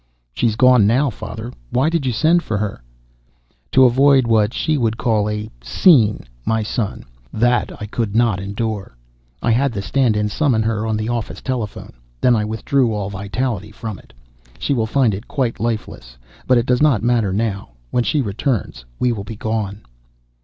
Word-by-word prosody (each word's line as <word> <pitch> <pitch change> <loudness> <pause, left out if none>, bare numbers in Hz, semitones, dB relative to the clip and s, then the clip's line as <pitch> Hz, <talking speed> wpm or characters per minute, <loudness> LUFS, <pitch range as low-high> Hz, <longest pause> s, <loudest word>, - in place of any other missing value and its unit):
"She's 110 - 0
gone 125 -3 +5
now, 130 +5 +2
father. 110 +2 -7 0.2
Why 130 +4 +1
did 165 -4 0
you - - +2
send 165 +9 +3
for 110 -10 -3
her?" 100 -9 -3 0.9
"To 130 0 +7
avoid 135 +1 +5
what 110 -2 +3
she 155 +5 0
would 115 -5 0
call 110 -2 +1
a 105 0 -3
scene, 105 - +4 0.2
my 110 - 0
son. 105 0 -3 0.3
That 120 +2 +1
I 105 - -5
could 110 -1 -3
not 115 -5 +2
endure. 100 - -4 0.5
I 120 - +2
had 135 +4 +2
the 100 - -3
stand 125 -2 +1
in 105 0 +1
summon 120 -1 +1
her 110 0 -1
on 110 -1 0
the 110 +1 -3
office 120 -2 -3
telephone, 120 -6 -4 0.3
then 125 - +4
I 105 - +1
withdrew 115 +3 0
all 105 -2 -3
vitality 105 +2 -3
from 110 -1 -7
it. - - -20 0.5
She - - -1
will 115 -4 0
find 125 -2 +2
it 100 +4 -7
quite 130 -5 -2
lifeless. 105 - -4 0.3
But 130 - +5
it 120 - +1
does 125 +1 +1
not 145 -8 +3
matter 120 -5 +2
now. 100 - -2 0.2
When 120 - +1
she 145 +4 +1
returns 105 - -2
we 125 - +1
will 105 -4 -4
be 110 +2 -8
gone." 110 -2 -3
115 Hz, 180 wpm, -19 LUFS, 105-125 Hz, 0.9 s, To